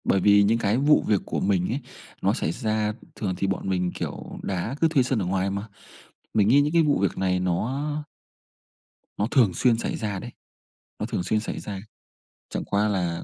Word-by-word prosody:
Bởi 95 - +2
vì 100 +1 +6
những 110 +3 +3
cái 110 0 +1
vụ 145 +3 +4
việc 105 -3 +3
của - - -2
mình 95 -2 +1
ấy, 125 - -1 0.4
nó - - +2
xảy 80 - -1
ra 110 +2 -1 0.2
thường 95 -4 -2
thì 95 - 0
bọn 95 0 -2
mình, 90 -1 0
kiểu, - - -6
đá 100 +6 -2
cứ 165 - +6
thuê 150 -5 +3
sân 125 -2 0
ở 95 - -1
ngoài 95 +1 0
mà. 100 +2 -4 0.7
Mình 105 -2 +4
nghĩ 135 +5 +6
những 145 +1 +1
cái 170 -1 +5
vụ 150 -2 +2
việc 95 -2 0
này 90 -1 +1
nó 120 - -1 1.3
nó 105 - +1
thường 115 -9 +4
xuyên 120 +3 +3
xảy - - -2
ra 105 -4 -3
đấy, 120 - -8 0.7
nó - - -1
thường 90 - -2
xuyên 110 - +1
xảy 105 - -4
ra. 100 -2 -6 0.7
Chẳng - - -3
qua 105 +1 +1
là 90 -5 -1
105 Hz, 210 wpm, -25 LUFS, 95-120 Hz, 1.3 s, vì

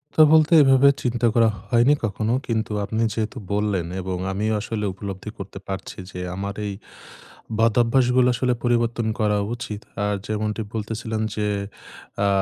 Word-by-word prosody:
তো - - +6
বলতে, 160 +1 +5
এভাবে 135 0 +6 0.2
চিন্তা 120 -1 0
করা 115 -1 +4 0.2
হয়নি 120 +5 +5
কখনো। 110 +2 -1
কিন্তু 110 -2 -1
আপনি 110 +3 -2
যেহেতু 110 +2 -3 0.2
বললেন, 100 -4 0 0.2
এবং 90 0 -3
আমি 100 +3 -2
আসলে 105 0 -3
উপলব্ধি 100 +1 -7
করতে 100 0 -8
পারছি 95 0 -6
যে, 90 - -7 0.2
আমার 100 +1 -4
এই 100 - -3 0.9
বদভ্যাসগুলো 120 +2 +3
আসলে 125 +1 +1
পরিবর্তন 120 -1 +1
করা 105 -1 +2 0.2
উচিত। 105 -3 -6 0.3
আর 105 - 0
যেমনটি 110 +1 -2
বলতেছিলেন 110 0 -3
যে, 105 -1 -1 0.8
আ - - +3
110 Hz, 145 wpm, -23 LUFS, 105-120 Hz, 0.9 s, তো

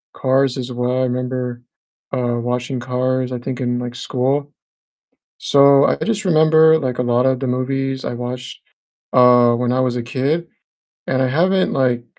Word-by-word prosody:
Cars 135 0 +1
as 125 0 -5
well, 125 +1 -1
I - - +1
remember, 125 -1 -3 0.5
uh, 120 -2 -1
watching 125 +2 -3
Cars, 130 +1 -2
I 125 - -3
think 130 +1 -6
in, 120 -1 -1
like, 120 -1 -5
school. 135 +3 -2 0.9
So, 140 0 +5
I - - +1
just 215 -3 -2
remember, 160 -1 +5
like, 130 -4 -3
a - - +1
lotta 125 +2 +2
the 130 +1 -4
movies 135 +1 -2
I - - -3
watched, 125 +1 -7 0.5
uh, 125 -1 +5
when 120 +1 -1
I 130 - 0
was 125 -1 -1
a 120 - -3
kid, 140 +7 -2 0.6
and 130 0 0
I 130 - +2
haven't, 185 +7 +1
like, 125 -3 0
130 Hz, 165 wpm, -18 LUFS, 125-135 Hz, 0.9 s, So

